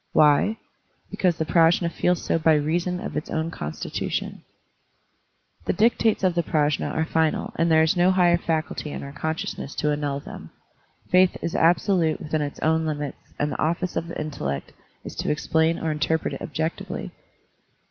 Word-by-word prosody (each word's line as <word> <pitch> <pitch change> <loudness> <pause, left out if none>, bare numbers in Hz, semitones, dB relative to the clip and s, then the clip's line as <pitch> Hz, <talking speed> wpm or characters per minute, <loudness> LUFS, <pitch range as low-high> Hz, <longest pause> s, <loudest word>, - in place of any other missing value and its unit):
Why? 150 +9 +4 0.5
Because 180 -3 +1
the 160 - -1
Prajfi^ 170 +1 +3
feels 180 0 0
so - - +1
by 160 -1 +4
reason 170 +4 0
of - - -6
its 150 - -3
own 160 +1 -2
constitution. 75 - -4 1.2
The - - +1
dictates 220 +1 +2
of 185 -2 +3
the 170 - +1
Prajfi^ 150 -3 0
are 160 - 0
final 160 -1 0
and 165 +1 +1
there 160 0 +5
is 160 - +2
no 175 +1 +4
higher 175 -2 +4
faculty 160 -2 -2
in - - -6
our 140 - -7
consciousness 155 -1 -4
to. 150 - 0
annul 145 -1 -1
them. - - -10 0.6
Faith 185 0 +5
is 170 - -2
absolute 170 -1 +2
within 155 0 -2
its 145 -1 -4
own 160 0 +2
limits 145 -2 -4 0.2
and 145 0 0
the - - -4
office 170 +3 -1
of 170 - -2
the 170 - -6
intellect 70 - -4 0.3
is - - -8
to - - -2
explain 160 +2 +1
or 160 - -2
interpret 155 +1 0
it - - -6
objectively. 160 - -4
160 Hz, 170 wpm, -24 LUFS, 150-170 Hz, 1.2 s, there